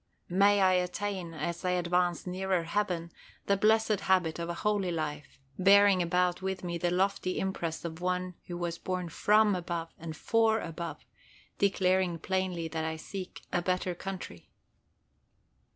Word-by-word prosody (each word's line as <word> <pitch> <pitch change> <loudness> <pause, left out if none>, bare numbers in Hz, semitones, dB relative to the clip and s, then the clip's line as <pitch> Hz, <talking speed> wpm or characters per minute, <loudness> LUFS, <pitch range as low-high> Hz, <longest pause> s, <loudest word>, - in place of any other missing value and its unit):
May 200 +3 +4
I 185 -1 +5
attain, 180 -1 -2
as 165 +4 -3
I 180 0 +1
advance 175 -1 +1
nearer 185 -1 -1
heaven, 170 -2 -1 0.3
the 200 - +3
blessed 215 0 +3
habit 180 -4 +1
of 170 0 -3
a 170 - -2
holy 205 -1 0
life, 155 -3 -4 0.2
bearing 200 0 +6
about 180 +1 +1
with 190 0 -3
me 170 -1 -3
the 175 - +1
lofty 185 0 0
impress 175 -4 -3
of 165 0 -6
one 180 0 -1
who 175 0 -3
is 170 -1 -4
born 180 -2 -3
from 210 +4 +4
above 170 -2 -3
and 160 -1 -7
for 225 -1 +2
above, 170 -1 -6 0.5
declaring 185 -3 +2
plainly 185 -1 -2
that 160 0 -3
I 160 0 -2
seek 185 +3 -7
"a 175 - +2
better 180 0 0
country." 175 - -7
180 Hz, 150 wpm, -30 LUFS, 170-190 Hz, 0.5 s, bearing